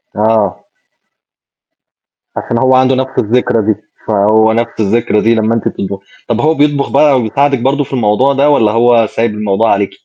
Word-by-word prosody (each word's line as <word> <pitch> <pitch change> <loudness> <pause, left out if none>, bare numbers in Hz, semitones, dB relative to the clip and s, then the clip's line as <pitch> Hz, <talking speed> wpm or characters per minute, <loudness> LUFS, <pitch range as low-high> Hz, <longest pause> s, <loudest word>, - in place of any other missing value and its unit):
آه. 105 -4 0 1.7
عشان 120 - -3
هو 130 +2 +2
عنده 130 0 +2
نفس 130 0 -3
الذكرى 115 -1 0
دي، 110 - +1 0.3
فهو 110 +1 +2
نفس 115 0 -2
الذكرى 110 +1 0
دي 115 +1 +2
لمّا 110 +1 0
أنتِ 115 - -2
بتطبخي. 95 0 -5 0.3
طَب 120 -1 -1
هو 155 +1 +2
بيطبخ 145 -1 0
بقى 145 -3 +3
وبيساعدِك 135 +4 0
برضه 140 +4 0
في 135 - -11
الموضوع 125 +3 +1
ده 140 +2 +2
والَّا 115 -8 +2
هو 115 0 +2
سايب 115 +1 -2
الموضوع 105 +1 0
عليكِ؟ 100 -1 0
115 Hz, 165 wpm, -12 LUFS, 105-130 Hz, 1.7 s, بقى